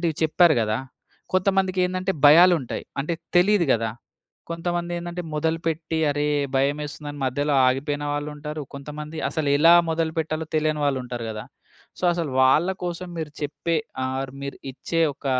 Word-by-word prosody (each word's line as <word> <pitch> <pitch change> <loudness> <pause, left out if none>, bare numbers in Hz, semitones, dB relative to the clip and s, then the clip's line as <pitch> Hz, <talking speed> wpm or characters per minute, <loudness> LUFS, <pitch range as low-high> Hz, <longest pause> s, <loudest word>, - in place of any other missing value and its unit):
ఇలాంటివి 165 -3 0
చెప్పారు 160 +1 +5
గదా! 110 +1 0 0.5
కొంతమందికేందంటే 185 -1 +1
భయాలుంటాయి. 165 -3 +5 0.2
అంటే 160 +5 -2 0.2
తెలీదు 180 0 +4
గదా! 115 -1 0 0.6
కొంతమందేందంటే 175 +1 -3
మొదలుపెట్టి 160 0 -1
అరే! 145 +1 -1 0.3
భయమేస్తుందని 145 +1 -2
మధ్యలో 145 +3 0
ఆగిపోయిన 145 +3 -1
వాళ్ళుంటారు. 150 +1 -5
కొంతమంది 150 +2 -7
అసలు 155 -3 -1
ఎలా 165 +3 +7 0.2
మొదలుపెట్టాలో 160 -1 -1
తెలియని 155 -1 0
వాళ్ళుంటారు 125 -4 -3
గదా! 110 0 -7 0.5
సో, - - -4
అసలు 170 -4 -2
వాళ్ళ 150 +8 +4
కోసం 180 0 -4
మీరు 155 -2 -4
చెప్పే 160 +3 -1 0.3
ఆర్ 130 0 -3
మీరు 140 - -5 0.2
ఇచ్చే 165 +5 -2
ఒక - - -29
155 Hz, 125 wpm, -24 LUFS, 145-170 Hz, 0.6 s, ఎలా